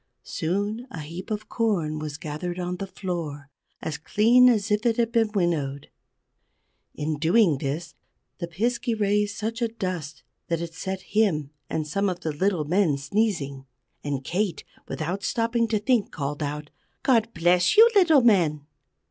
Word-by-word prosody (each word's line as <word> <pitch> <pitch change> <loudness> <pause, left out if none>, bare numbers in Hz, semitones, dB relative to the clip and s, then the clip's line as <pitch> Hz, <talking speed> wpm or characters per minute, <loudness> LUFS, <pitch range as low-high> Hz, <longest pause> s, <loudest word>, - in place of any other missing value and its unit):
Soon 205 +8 -2
a 165 - -7
heap 170 +7 -8
of 215 -1 -3
corn 175 -10 0
was 150 -1 -5
gathered 160 +4 -5
on 180 0 -3
the 195 - -5
floor, 160 -7 -5 0.3
as 155 -2 -3
clean 235 +9 +5
as 215 -3 +1
if 210 +1 +2
it 230 -2 +2
had 235 -1 +1
been 230 -2 +2
winnowed. 150 -8 -1 1.0
In 150 0 -2
doing 165 -2 +4
this 155 +5 -4 0.5
the 170 - -3
Piskey 235 +6 -1
raised 205 0 +1
such 225 +2 -3
a 235 - +2
dust 185 -9 -5 0.2
that 170 -2 0
it 170 0 -5
set 190 +2 -4
him 180 -11 +1 0.2
and 155 -1 -2
some 195 +6 0
of 180 -1 -4
the 160 - -2
little 180 0 0
men 170 -2 +2
sneezing. 140 -6 -1 0.4
And 140 -2 -3
Kate, 185 +6 -1 0.2
without 175 +5 -3
stopping 230 0 +1
to 220 -1 +1
think, 220 +1 +1
called 145 +1 -4
out: 150 0 -4 0.3
"God 230 -4 +3
bless 175 - +3
you, 450 +2 +10
little 335 -9 +6
men!" 170 - +3
180 Hz, 160 wpm, -25 LUFS, 155-220 Hz, 1.0 s, you